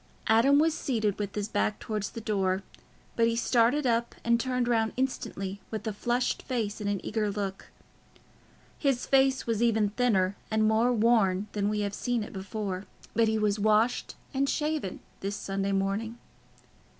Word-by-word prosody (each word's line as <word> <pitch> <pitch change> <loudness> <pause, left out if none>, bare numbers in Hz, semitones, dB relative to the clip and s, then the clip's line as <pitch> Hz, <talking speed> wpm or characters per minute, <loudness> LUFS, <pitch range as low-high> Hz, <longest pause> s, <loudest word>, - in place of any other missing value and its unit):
Adam 235 +6 +5
was 315 +2 +4
seated 220 - -1
with 205 -1 -3
his 205 -1 -2
back 210 -1 0
towards 210 -2 -3
the 230 - -7
door, 195 -3 0 0.5
but 230 -1 +3
he 230 - +1
started 240 +4 +2
up 235 -1 +1
and 235 0 +3
turned 250 0 0
round 225 -2 +1
instantly, 200 -7 -3
with 215 -2 -5
a 220 - -2
flushed 240 +4 0
face 225 -5 -3
and 205 - -1
an 200 -1 0
eager 215 -1 0
look. 195 -1 -4 1.1
His 275 -4 +1
face 270 -1 +3
was 230 -1 -1
even 220 -3 +3
thinner 205 -5 +2
and 220 0 +2
more 225 +3 +3
worn 215 -5 +3
than 205 -1 0
we 210 0 -1
have 200 -1 -2
seen 240 +1 -1
it - - -9
before, 195 -1 -4 0.3
but 230 -1 +3
he 220 0 +1
was 210 -1 +1
washed 215 +3 +2 0.2
and 275 +1 +1
shaven 300 -10 -2 0.2
this 200 +1 -3
Sunday 195 0 -2
morning. 200 +4 -1
220 Hz, 170 wpm, -28 LUFS, 205-240 Hz, 1.1 s, Adam